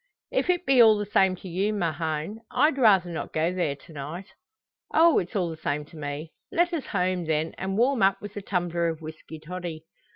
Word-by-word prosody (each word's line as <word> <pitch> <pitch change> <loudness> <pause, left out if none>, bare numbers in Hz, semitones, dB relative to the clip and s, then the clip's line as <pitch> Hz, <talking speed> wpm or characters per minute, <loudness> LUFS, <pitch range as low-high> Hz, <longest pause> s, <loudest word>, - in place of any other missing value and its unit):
"If - - 0
it 360 0 +1
be 265 -3 +6
all 220 -2 +7
the 205 - -2
same 190 -2 +3
to 185 - -11
you, 195 +5 0
Mahon, 165 +1 -2
I'd 300 -2 +2
rather 195 -7 +5
not 165 - -5
go 160 +3 0
there 175 -6 -1
to 160 +4 -16
night." 155 +6 -6 0.7
"Oh! 330 0 +5
it's 175 - -6
all 180 -4 0
the 160 - -8
same 150 -1 -2
to 160 - -17
me. 150 +1 -5 0.2
Let 345 +1 +2
us 315 -5 -3
home, 180 -3 0
then, 160 0 -1
and 190 +1 -2
warm 250 0 +2
up 195 0 +4
with 205 0 -9
a 205 - -4
tumbler 175 -3 -1
of 165 -1 -3
whisky 160 0 -9
toddy. 165 -1 -6
180 Hz, 215 wpm, -26 LUFS, 160-205 Hz, 0.7 s, all